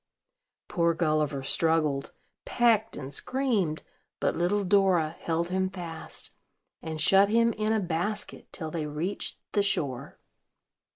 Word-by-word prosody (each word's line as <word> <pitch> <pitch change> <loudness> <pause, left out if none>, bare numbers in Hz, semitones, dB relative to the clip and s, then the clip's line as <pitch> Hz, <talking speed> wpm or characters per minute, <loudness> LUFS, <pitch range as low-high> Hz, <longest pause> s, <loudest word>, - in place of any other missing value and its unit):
Poor 170 -1 +1
Gulliver 155 -4 0
struggled, 155 -2 +1 0.3
pecked 225 -3 +2
and 140 0 -7
screamed; 225 - 0 0.4
but - - 0
little 200 +4 +1
Dora 185 -5 +3
held 170 +1 -1
him 190 0 0
fast, 170 -4 -5 0.5
and 160 -1 -5
shut 195 +5 +5
him 230 +1 +3
in 215 +1 -1
a 220 - +2
basket 180 +3 -3
till 160 -3 -6
they 155 -2 -3
reached 160 +7 -2
the 205 - +2
shore. 140 -10 -2
175 Hz, 125 wpm, -28 LUFS, 155-205 Hz, 0.5 s, shut